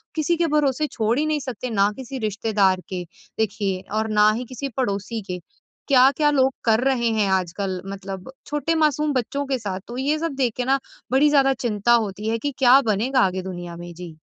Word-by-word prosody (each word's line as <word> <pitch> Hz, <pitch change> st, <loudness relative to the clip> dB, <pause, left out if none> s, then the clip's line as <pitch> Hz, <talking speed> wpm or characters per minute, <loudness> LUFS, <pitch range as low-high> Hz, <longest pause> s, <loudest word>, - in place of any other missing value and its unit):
किसी 320 Hz, +2 st, +1 dB
के 340 Hz, -, +2 dB
भरोसे 295 Hz, +1 st, +1 dB
छोड़ 225 Hz, 0 st, 0 dB
ही 305 Hz, -, +1 dB
नहीं 310 Hz, -1 st, 0 dB
सकते? 255 Hz, -2 st, -5 dB
ना 205 Hz, -2 st, +2 dB
किसी 265 Hz, 0 st, -6 dB
रिश्तेदार 200 Hz, -3 st, +1 dB
के 180 Hz, -2 st, -4 dB, 0.4 s
देखिए 195 Hz, -3 st, -1 dB
और 220 Hz, 0 st, 0 dB
ना 210 Hz, 0 st, +5 dB
ही 240 Hz, +3 st, -3 dB
किसी 260 Hz, +2 st, -5 dB
पड़ोसी 210 Hz, -2 st, -2 dB
के 180 Hz, -, -4 dB, 0.5 s
क्या-क्या 275 Hz, +2 st, +5 dB
लोग 265 Hz, -2 st, +3 dB
कर 220 Hz, -1 st, +4 dB
रहे 250 Hz, -4 st, +2 dB
हैं 205 Hz, -2 st, +2 dB
आजकल 185 Hz, +1 st, -1 dB
मतलब 195 Hz, +3 st, -7 dB, 0.2 s
छोटे 295 Hz, +2 st, -1 dB
मासूम 300 Hz, -1 st, +2 dB
बच्चों 280 Hz, +3 st, -1 dB
के 270 Hz, -1 st, 0 dB
साथ 195 Hz, -4 st, -4 dB
तो 240 Hz, -, -7 dB
ये 285 Hz, +4 st, +1 dB
सब 330 Hz, -2 st, -2 dB
देख 250 Hz, -4 st, 0 dB
के 250 Hz, -, -1 dB
ना 270 Hz, +1 st, +2 dB, 0.3 s
बड़ी 280 Hz, +3 st, +5 dB
ज़्यादा 275 Hz, -2 st, +4 dB
चिंता 210 Hz, +1 st, +1 dB
होती 210 Hz, -2 st, 0 dB
है 230 Hz, -, 0 dB
कि 290 Hz, -, -2 dB
क्या 260 Hz, +1 st, +7 dB
बनेगा 245 Hz, +6 st, +1 dB
आगे 185 Hz, 0 st, +1 dB
दुनिया 175 Hz, -2 st, -7 dB
में, 175 Hz, 0 st, -8 dB
जी। 170 Hz, -2 st, -10 dB
235 Hz, 200 wpm, -23 LUFS, 200-270 Hz, 0.5 s, क्या